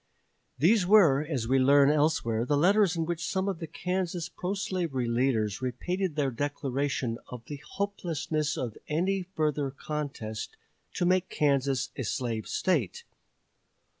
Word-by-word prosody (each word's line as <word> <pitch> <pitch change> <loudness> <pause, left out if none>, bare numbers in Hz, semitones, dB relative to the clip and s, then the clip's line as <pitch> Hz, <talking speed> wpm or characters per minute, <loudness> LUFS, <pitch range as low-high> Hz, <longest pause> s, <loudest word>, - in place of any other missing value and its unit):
These 180 - +4
were, 170 -9 +6
as 140 -7 -3
we 135 +2 +3
learn 140 +2 +6
elsewhere, 145 -7 +1
the 145 +3 +1
letters 195 +3 +4
in 165 -1 -1
which 170 0 -3
some 190 +4 -1
of 190 -4 -2
the 165 - -5
Kansas 180 0 -3
pro 185 +3 -3
slavery 175 - -2
leaders 115 -3 0
repeated 175 +8 -2
their 140 -3 +1
declaration 135 -2 -2
of 120 -2 -9
the 145 - -6 0.2
hopelessness 160 -6 -2
of 120 -4 -4
any 185 +5 0
further 155 -6 -1
contest 135 -7 -5 0.4
to 175 - 0
make 185 +1 +2
Kansas 140 -3 +1
a - - -4
slave 115 -1 -2
State. 150 - 0
150 Hz, 140 wpm, -28 LUFS, 130-180 Hz, 0.4 s, were